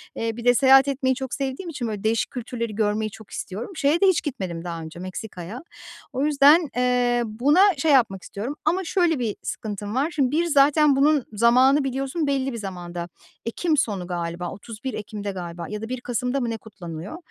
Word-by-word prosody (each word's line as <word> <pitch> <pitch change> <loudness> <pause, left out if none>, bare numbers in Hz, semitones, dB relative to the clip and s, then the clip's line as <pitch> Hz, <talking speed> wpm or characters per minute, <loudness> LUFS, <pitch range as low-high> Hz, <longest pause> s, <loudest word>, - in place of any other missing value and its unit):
Eee, 225 0 -3
bir 235 - -7
de 245 - +6
seyahat 270 +1 +6
etmeyi 260 -1 +1
çok 265 -1 -5
sevdiğim 275 +6 -3
için 260 -7 -4
böyle 210 -2 -5
değişik 225 +1 0
kültürleri 235 -3 -4
görmeyi 215 0 0
çok 220 0 -14
istiyorum. 210 - -5
Şeye 310 +2 +2
de 395 - +6
hiç 375 -4 +3
gitmedim 190 - -4
daha 170 -2 -4
önce 160 +2 -9
Meksika'ya. 185 - -7 0.5
O 265 +3 0
yüzden, 300 +2 +5
eee, 245 -1 +2
buna 255 - +3 0.2
şey 305 +2 +2
yapmak 215 -8 +3
istiyorum 235 +9 -5
ama 355 +5 +2
şöyle 345 -4 +1
bir 225 -4 -1
sıkıntım 210 0 -5
var. 285 +5 +1
Şimdi, 275 -4 +1
bir, 335 +3 +2
zaten 295 -1 +4
bunun 285 -1 +3
zamanı 255 +6 +4
biliyorsun 270 +4 -2
belli 270 -1 0
bir - - -4
zamanda, 175 -4 -6 0.4
ekim 305 +6 0
sonu 195 -8 -1
galiba, 175 0 -4
31 230 +5 -7
Ekim'de 205 -1 -5
galiba 170 -2 -6
ya 210 0 -5
da 225 - -6
1 255 -1 -4
Kasım'da 250 +2 -1
mı 240 -3 -1
ne 225 - -3
kutlanıyor. 180 - -8
245 Hz, 190 wpm, -24 LUFS, 205-275 Hz, 0.5 s, de